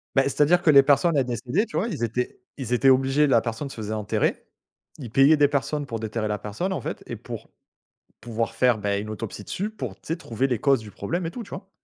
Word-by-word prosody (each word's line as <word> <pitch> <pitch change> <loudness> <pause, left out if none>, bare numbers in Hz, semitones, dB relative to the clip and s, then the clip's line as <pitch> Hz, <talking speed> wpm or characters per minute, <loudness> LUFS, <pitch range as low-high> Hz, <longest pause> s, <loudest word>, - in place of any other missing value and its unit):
Beh, 135 - +5
c'est 145 - -2
à - - +7
dire 175 +3 +4
que 175 - +2
les 140 -2 +8
personnes, 145 +4 +3
elles 135 - +2
décédaient, 125 - -1
tu 220 - -5
vois? 230 - +1
Ils 120 - -4
étaient 120 +2 -2 0.2
ils 125 -3 -3
étaient 135 +2 +4
obligés 135 +3 +4
la 120 -4 +4
personne 120 +5 -4
se - - -10
faisait 110 -1 -4
enterrer, 105 -1 -1 0.5
ils 120 -5 -8
payaient 140 +5 +6
des 145 - +5
personnes 145 +1 -1
pour 115 -5 -5
déterrer 110 0 -3
la 105 -1 -2
personne 145 - -3
en - - -3
fait, - - -5
et - - -5
pour, - - -8 0.7
pouvoir 115 0 -3
faire, 125 -3 +3
beh, 100 -1 -1
une 105 - -6
autopsie 105 -1 -6
dessus 205 +3 -3
pour, 130 - -6
tu - - -37
sais? 165 - 0
Trouver 125 -3 -1
les 125 - 0
causes 135 -4 +3
du 105 -1 -10
problème 170 - -3
et - - -3
tout, 240 - -7
tu 200 - -13
vois? 195 - -8
130 Hz, 260 wpm, -25 LUFS, 110-150 Hz, 0.7 s, les